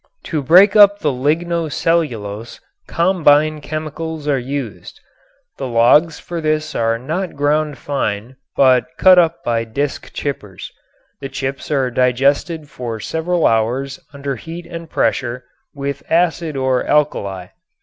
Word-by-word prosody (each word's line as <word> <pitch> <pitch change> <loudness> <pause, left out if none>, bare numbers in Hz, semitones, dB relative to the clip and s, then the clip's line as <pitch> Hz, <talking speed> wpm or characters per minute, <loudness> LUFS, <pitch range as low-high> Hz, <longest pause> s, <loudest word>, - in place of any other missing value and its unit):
To 155 -3 -2
break 185 +9 +6
up 205 -1 +7
the 150 -7 0
ligno 160 +4 -1
cellulose 115 -11 -2 0.3
combine 155 -4 +3
chemicals 155 +1 -5
are 140 -2 +2
used. 130 -3 -6 0.6
The 135 - -3
logs 125 +7 +4
for 170 -1 -6
this 155 0 -1
are 115 0 0
not 160 +10 -4
ground 145 0 0
fine, 120 -3 -3 0.2
but 130 -3 +4
cut 185 -1 +7
up 165 -2 +1
by 115 -1 0
disk 140 +6 -4
chippers. 105 -10 -6 0.5
The 135 - -6
chips 135 0 -5
are 135 -4 0
digested 140 +6 +1
for 120 -5 -6
several 165 +7 -1
hours 125 +5 0
under 140 -2 -5
heat 165 +7 -8
and 170 -1 -8
pressure 125 -3 -1 0.3
with 140 0 -4
acid 165 -3 +1
or 130 -1 +1
alkali. 100 -11 0
145 Hz, 130 wpm, -18 LUFS, 125-160 Hz, 0.6 s, up